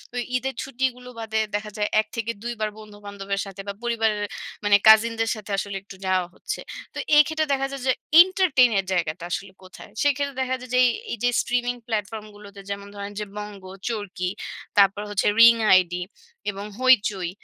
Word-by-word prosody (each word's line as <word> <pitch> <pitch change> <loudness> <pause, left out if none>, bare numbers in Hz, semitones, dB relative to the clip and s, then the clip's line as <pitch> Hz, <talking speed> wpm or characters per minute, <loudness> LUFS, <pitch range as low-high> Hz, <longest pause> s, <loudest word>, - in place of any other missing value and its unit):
ওই 245 - -1
ঈদের 265 +2 -4
ছুটিগুলো 255 -1 -3
বাদে 220 -1 -2 0.2
দেখা 210 0 -4
যায় 210 0 0
এক 215 - -14
থেকে 230 0 -2
দুইবার 230 -3 -2
বন্ধু-বান্ধবের 200 -2 -6
সাথে 195 0 -8
বা 200 - -3
পরিবারের 220 -3 0 0.4
মানে 205 -1 +6
কাজিনদের 225 +1 +6
সাথে 210 -1 -9
আসলে 195 0 -3
একটু 195 - -12
যাওয়া 185 -1 +1
হচ্ছে। - - -5 0.3
তো - - -10 0.2
এক্ষেত্রে 315 +1 +4
দেখা 270 0 0
যায় 275 - -6
যে 260 - +5 0.3
এন্টারটেইন 360 -9 +4
এর 195 - -3
জায়গাটা 170 -1 -1
আসলে 195 +3 -4
কোথায়? 185 +2 -13
সেক্ষেত্রে 280 -1 0
দেখা 260 0 0
যায় 255 - -10
যে - - +5
এই, - - +5 0.2
এইযে 240 +1 0
স্ট্রিমিং 245 0 -1
প্লাটফর্ম 215 -1 -3
গুলোতে 200 -1 -12
যেমন 200 0 -5
ধরেন 200 0 -6
যে 210 - -3
বঙ্গ, 210 -2 -7 0.3
চরকি, 205 -5 -3 0.5
তারপর 200 0 +5
হচ্ছে 205 -1 0
রিং 230 0 +9 0.2
আইডি 180 -1 +3 0.5
এবং 200 +1 -7
হইচই 210 -8 +3
215 Hz, 170 wpm, -24 LUFS, 200-245 Hz, 0.5 s, রিং